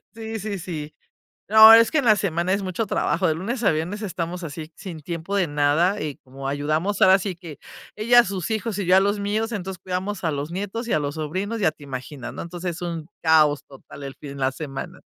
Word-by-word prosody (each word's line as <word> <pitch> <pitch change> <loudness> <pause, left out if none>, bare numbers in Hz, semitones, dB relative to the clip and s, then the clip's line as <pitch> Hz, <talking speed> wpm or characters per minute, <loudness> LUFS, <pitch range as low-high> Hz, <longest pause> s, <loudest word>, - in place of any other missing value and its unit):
Sí, 225 0 -5
sí, 205 -1 -4
sí. 155 -4 -6 0.5
No, 220 +1 +10
es 230 0 +6
que 315 - +1
en 280 - +1
la 220 -3 +6
semana 180 -2 0
es 200 0 0
mucho 190 +4 -2
trabajo. 185 -1 0
De 160 - +2
lunes 225 +8 -3
a - - +5
viernes 170 +7 -3
estamos 175 -2 -4
así 155 0 -7
sin 180 -5 -8
tiempo 170 +5 -5
de 190 -4 +2
nada, 150 +7 +2
y 150 -2 -4
como 135 +1 -8
ayudamos 155 +8 -1
ahora 190 +1 +7
sí 190 -1 -4
que 165 -4 -11 0.4
ella 235 +3 +6
a - - +2
sus 190 -3 -4
hijos, 220 -1 -2
y 195 - -2
yo 180 +1 +5
a - - +7
los 200 +1 +1
míos, 210 +3 -1
entonces, 190 -3 -5
cuidamos 190 +2 -3
a 160 - +2
los 145 +1 -4
nietos 205 +5 -4
y - - 0
a - - +3
los 145 0 -3
sobrinos. 185 +9 -3
Ya 160 -6 +3
te - - -20
imaginas, 130 -2 -7
¿no? - - -6
Entonces 175 0 -5
es - - -9
un 165 -3 -4
caos 155 -3 +4
total 140 +1 -12
el 135 -1 -7
fin 140 -1 -9
la 130 0 +1
semana. 135 -1 -7
180 Hz, 235 wpm, -23 LUFS, 155-205 Hz, 0.5 s, No